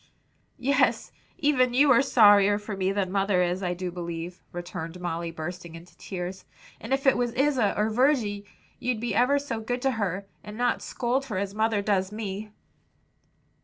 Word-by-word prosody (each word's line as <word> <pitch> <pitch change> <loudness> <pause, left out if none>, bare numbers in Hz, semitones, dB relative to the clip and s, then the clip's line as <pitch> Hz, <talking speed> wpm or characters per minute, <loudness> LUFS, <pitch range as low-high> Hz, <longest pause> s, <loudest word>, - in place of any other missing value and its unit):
"Yes, 280 +3 +1 0.3
even 260 -6 +2
you 280 +1 +5
are 250 - +6
sorrier 205 -6 +5
for 210 0 -6
me 190 0 0
than 195 -2 -1
mother 195 -2 +2
is, 180 +2 -1
I 180 -2 -1
do 180 0 -4
believe!" 170 0 -6
returned 175 -1 -6
Molly, 170 -1 -3
bursting 170 +1 -7
into 170 +1 -13
tears; 185 0 -6 0.4
"and - - -9
if 270 +1 0
it 270 - +5
was 240 -1 -1
Isa 260 -6 +2
or 215 +1 +1
Virgy 225 -5 +1 0.4
you'd 245 -3 -1
be 235 +1 -2
ever 255 +4 +3
so 280 -5 -3
good 245 +3 -3
to 270 - +3
her, 200 -4 -2 0.2
and 210 +1 -9
not 245 0 +1
scold 255 +2 -1
her 215 -8 -4
as 200 0 -2
mother 220 -1 +1
does 195 -2 0
me." 210 -1 -5
205 Hz, 175 wpm, -26 LUFS, 180-245 Hz, 0.4 s, are